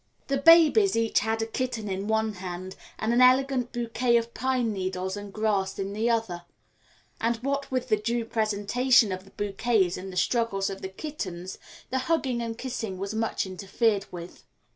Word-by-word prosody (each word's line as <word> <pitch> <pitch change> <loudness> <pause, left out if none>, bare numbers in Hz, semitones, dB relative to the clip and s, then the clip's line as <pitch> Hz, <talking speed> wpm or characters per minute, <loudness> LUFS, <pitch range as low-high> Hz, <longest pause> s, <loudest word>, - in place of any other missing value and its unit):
The 275 - +2
babies 335 +6 +6
each 230 -1 +2
had 225 +1 -1
a - - -1
kitten 230 -1 -3
in 195 +1 -3
one 220 0 +1
hand 185 0 -7 0.2
and 220 +2 0
an 245 - +4
elegant 255 -1 +4
bouquet 235 0 +1
of 235 0 -3
pine 250 -3 0
needles 185 0 -3
and 205 -1 -7
grass 205 -2 0
in 195 +1 -3
the 220 +3 0
other, 220 -7 -1 0.8
and 230 +1 +1
what 280 +1 -1
with 255 -1 -2
the 215 - +4
due 235 +1 -1
presentation 220 +2 +2
of 185 +1 -5
the - - -16
bouquets 200 -2 0
and 190 +1 -7
the 180 - -7
struggles 200 -1 +1
of 195 - -7
the 190 - -5
kittens, 190 - -6 0.3
the 260 - +1
hugging 265 -7 +1
and 230 -1 -4
kissing 230 -7 -4
was 195 +2 -4
much 225 -1 -1
interfered 195 +2 0
with. 175 0 -9
220 Hz, 180 wpm, -27 LUFS, 195-245 Hz, 0.8 s, babies